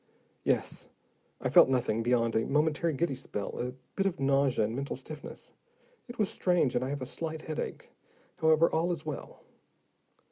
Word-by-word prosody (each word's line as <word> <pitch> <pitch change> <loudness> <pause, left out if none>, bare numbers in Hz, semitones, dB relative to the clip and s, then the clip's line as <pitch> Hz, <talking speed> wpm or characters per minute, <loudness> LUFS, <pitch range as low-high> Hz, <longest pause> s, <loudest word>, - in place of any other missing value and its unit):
"Yes. - - -1 0.5
I - - -2
felt - - +8
nothing 120 -4 +1
beyond 115 -1 +2
a 110 - +2
momentary 155 +3 +2
giddy 160 0 0
spell, 105 -6 -5
a 125 +1 -2 0.2
bit 195 0 +2
of 190 - -3
nausea 135 -4 +3
and 110 +2 -3
mental 140 +2 -3
stiffness. 145 +3 -9 0.6
It 240 0 -9
was 210 - +2
strange, 175 -9 +2
and 120 - +1
I 130 - -2
have 140 -1 -3
a - - -3
slight 160 +4 -5
headache. 155 - -5 0.5
However, 160 +1 +5
all 165 +2 +1
is 160 -3 -4
well." 150 -2 -7
140 Hz, 170 wpm, -30 LUFS, 125-160 Hz, 0.6 s, felt